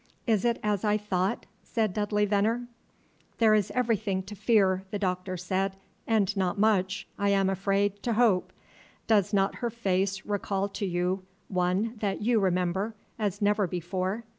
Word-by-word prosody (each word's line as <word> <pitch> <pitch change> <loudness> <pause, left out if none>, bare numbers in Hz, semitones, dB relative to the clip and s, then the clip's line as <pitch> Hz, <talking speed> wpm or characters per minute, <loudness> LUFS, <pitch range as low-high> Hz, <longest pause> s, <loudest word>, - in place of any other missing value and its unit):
"Is 220 -2 +2
it 235 -1 +2
as 210 -2 0
I 210 -1 +3
thought?" 195 -2 -1 0.2
said 220 -5 -1
Dudley 210 0 +1
Veneer. 215 +4 +1 0.7
"There 220 -2 +5
is 210 -3 +2
everything 215 -6 0
to 195 +3 -9
fear," 190 -3 +3
the 205 - -2
Doctor 185 -1 -2
said, 190 +2 -1 0.3
"and 210 -3 +2
not 190 -2 0
much, 200 -1 +2
I 200 0 +2
am 195 -1 +3
afraid, 200 +1 0
to 235 - 0
hope. 215 -5 +3 0.5
Does 205 -3 +3
not 195 -1 +1
her 240 - -2
face 195 -4 -1
recall 200 -1 -1
to 200 0 -3
you 180 +1 0 0.3
one 190 +5 0
that 200 -2 -1
you 235 0 +3
remember, 190 +3 0 0.2
as 205 -1 -1
never 205 -1 +3
before?" 185 +5 -3
200 Hz, 160 wpm, -28 LUFS, 190-215 Hz, 0.7 s, There